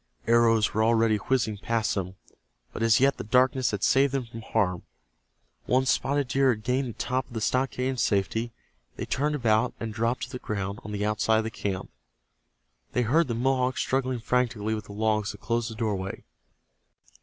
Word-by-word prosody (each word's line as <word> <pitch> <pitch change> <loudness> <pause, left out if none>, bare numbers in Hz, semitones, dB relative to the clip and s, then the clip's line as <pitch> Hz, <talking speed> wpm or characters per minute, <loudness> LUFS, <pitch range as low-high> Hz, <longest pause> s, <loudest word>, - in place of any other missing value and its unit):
Arrows 115 -1 +4
were 110 - +2
already 115 -1 +3
whizzing 110 -2 -1
past 115 0 0
them, 95 -1 -3 0.6
but - - -6
as 115 -1 +4
yet 135 0 +3
the - - -5
darkness 125 +2 +3
had 105 -2 -3
saved 135 0 +3
them 130 -3 -1
from 115 0 -9
harm. 100 -5 0 0.9
Once 130 0 +3
Spotted 140 +2 0
Deer 135 +2 +3
had 110 -4 0
gained 130 +2 0
the - - -6
top 130 +3 -2
of 125 - -15
the - - -1
stockade 130 +2 0
in 130 -1 -2
safety, 110 +1 0 0.4
they - - -4
turned 150 +2 0
about 115 -2 +1
and 115 -2 -4
dropped 115 +3 -1
to - - -5
the 125 - -5
ground 100 -3 -4
on 105 - -7
the 105 0 -2
outside 110 +1 +2
of 110 - +1
the 110 - -4
camp. 95 -3 -4 1.0
They 125 - +2
heard 155 +9 +3
the 120 - -2
Mohawks 130 +1 +1
struggling 130 -2 -1
frantically 115 -3 0
with 105 -2 -4
the - - -11
logs 105 -1 0
that 105 - -14
closed 115 0 -1
the 110 - -8
doorway. 100 -4 -3
115 Hz, 190 wpm, -27 LUFS, 110-130 Hz, 1.0 s, Arrows